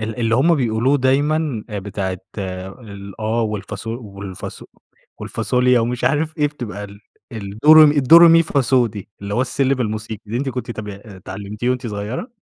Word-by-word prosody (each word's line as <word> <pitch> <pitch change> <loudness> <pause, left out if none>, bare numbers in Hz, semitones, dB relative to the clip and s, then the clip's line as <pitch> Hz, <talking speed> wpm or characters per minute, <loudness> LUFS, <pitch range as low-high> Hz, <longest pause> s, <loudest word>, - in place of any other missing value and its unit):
ال 110 +2 -5
اللي 115 -1 +2
هُم 165 +7 +4
بيقولوه 125 +1 +1
دايمًا 140 -1 +1
بتاعة 95 -2 -4 0.2
الآه 100 +3 -5
والفاص 105 0 -5
والفاص 100 -5 -7 0.6
والفاصوليا 125 -1 +1
ومش 120 +1 -2
عارف 155 +2 0
إيه 150 - +3
بتبقى 110 -8 -6
ال 100 0 -12 0.3
الدو 110 +7 +2
ري 155 0 +10
مي 145 0 +2
الدو 145 +4 +7
ري 170 0 +9
مي 165 0 +6
فا 145 -3 0
صو 125 -1 +3
دي، 105 -3 -8
اللي 100 +1 -4
هو 125 - +1
السلم 135 +1 0
الموسيقي، 110 -1 -4
دي 110 +3 -4
أنتِ 135 +1 -2
كنتِ 125 -2 -5
تابع 105 -3 -6
اتعلمتيه 100 +3 -5
وأنتِ 125 -1 -2
صغيرة؟ 105 - -5
115 Hz, 170 wpm, -20 LUFS, 105-130 Hz, 0.6 s, ري